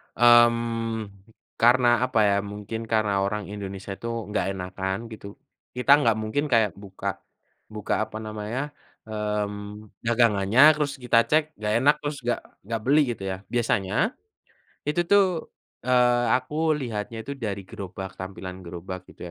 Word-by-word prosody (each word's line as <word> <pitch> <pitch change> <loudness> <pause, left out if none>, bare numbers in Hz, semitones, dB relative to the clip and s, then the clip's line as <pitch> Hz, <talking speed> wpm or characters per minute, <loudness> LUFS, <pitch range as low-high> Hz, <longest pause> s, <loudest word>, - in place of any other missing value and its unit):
Mmm, 115 -2 +4 0.5
karena 120 +2 +5 0.2
apa 120 -3 +1
ya, 100 -1 +3
mungkin 105 +3 -6
karena 110 -3 +1
orang 100 +1 -2
Indonesia 100 -1 -6
itu 115 - -5 0.2
nggak 105 - 0
enakan 95 +1 -3
gitu. 100 -2 -9 0.4
Kita 125 +2 +2
nggak 115 -6 +3
mungkin 110 +7 -1
kayak 115 -6 +3
buka 100 -1 -5 0.5
buka 105 -1 -4
apa 110 - -8
namanya, 110 +7 -4 0.3
mmm, 105 -1 -4 0.2
dagangannya 115 -1 +3
terus 145 -2 -1
kita 115 -1 +4
cek 155 +1 +4 0.2
nggak 105 0 -1
enak, 145 +2 +6
terus 145 0 -4
nggak 120 0 0 0.2
nggak 115 +2 -3
beli 145 +4 +5
gitu 110 - -7
ya. 95 -1 -2
Biasanya, 115 - +1 0.7
itu 150 +4 0
tuh, 200 +1 +6 0.6
eee, 125 -1 +4
aku 155 +5 0
lihatnya 115 -4 -4
itu 140 - -6
dari 100 -4 -3
gerobak, 95 0 -8
tampilan 95 0 -7
gerobak 90 +1 -8
gitu - - -13
110 Hz, 140 wpm, -25 LUFS, 100-120 Hz, 0.7 s, enak